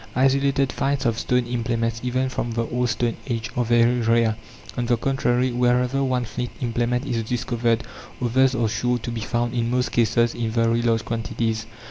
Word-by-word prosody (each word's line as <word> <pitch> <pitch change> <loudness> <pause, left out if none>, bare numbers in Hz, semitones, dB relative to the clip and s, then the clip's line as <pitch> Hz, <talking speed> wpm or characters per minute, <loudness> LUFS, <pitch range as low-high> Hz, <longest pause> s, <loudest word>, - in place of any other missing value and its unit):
Isolated 135 +1 +2
finds 135 -1 -1
of 115 -1 +1
stone 125 -1 +1
implements, 115 -1 -1
even 130 +1 0
from 120 -2 -3
the 115 0 0
old 125 +1 -1
stone 120 -1 -1
age, 115 -2 -3
are 125 - +1
very 120 +1 +3
rare; 115 -1 +2 0.4
on 120 -1 -2
the 120 -1 +2
contrary, 125 0 +1
wherever 125 +2 +2
one 130 -2 0
flint 125 +2 -4
implement 120 +1 -1
is 120 -4 -1
discovered 115 0 0 0.4
others 130 +2 +2
are 115 -3 +1
sure 125 +3 0
to 120 0 -5
be 115 -1 -4
found, 120 +1 -1
in 120 -1 0
most 125 +1 0
cases 115 0 +2
in 115 -1 -2
very 115 +1 +2
large 115 -1 +1
quantities. 115 -1 -2
120 Hz, 180 wpm, -23 LUFS, 115-125 Hz, 0.4 s, very